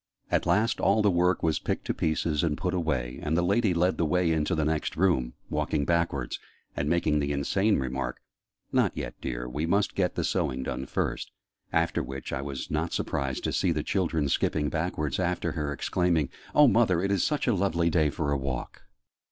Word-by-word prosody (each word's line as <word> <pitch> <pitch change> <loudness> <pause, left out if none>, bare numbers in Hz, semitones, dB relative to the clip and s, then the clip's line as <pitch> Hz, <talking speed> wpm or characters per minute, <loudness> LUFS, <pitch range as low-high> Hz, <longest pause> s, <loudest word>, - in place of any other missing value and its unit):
At - - +1
last 115 +2 +2
all 105 +2 +3
the 100 - +4
work 90 +1 +2
was 80 -2 +2
picked - - -3
to - - 0
pieces 80 -1 0
and 80 -3 0
put 90 - -2
away, 70 -8 -1
and 75 +2 0
the 90 - +2
lady 100 +3 +2
led 90 +2 +2
the - - +3
way 90 0 +2
into 80 +3 +1
the 80 -1 0
next 75 0 -1
room, 80 -9 +1
walking 75 -2 -1
backwards, 85 -7 0 0.4
and 70 +1 -1
making 80 -3 +2
the 70 0 -1
insane 95 +9 +1
remark 65 0 -3 0.5
"Not - - +2
yet, - - -4
dear: - - -4
we 75 +6 -2
must 100 +4 +1
get 90 -2 0
the - - -1
sewing 65 0 -1
done 65 0 -4
first." - - -2 0.4
After - - +1
which, 65 0 -6
I - - -1
was 70 -1 -5
not - - -1
surprised 65 -1 -2
to - - -1
see 90 - +2
the 75 -2 -1
children 80 -6 0
skipping 75 +2 +1
backwards 80 -3 -2
after 90 -2 0
her, 75 -3 -2
exclaiming 85 0 +1 0.3
"Oh, 150 -1 +8
mother, 110 -8 +3
it 100 - 0
is 100 -3 +2
such 150 -1 0
a 120 - +3
lovely 85 -3 +1
day 80 -2 +3
for 70 0 -2
a 70 - +2
walk!" 65 -2 -4
80 Hz, 200 wpm, -28 LUFS, 70-90 Hz, 0.5 s, Oh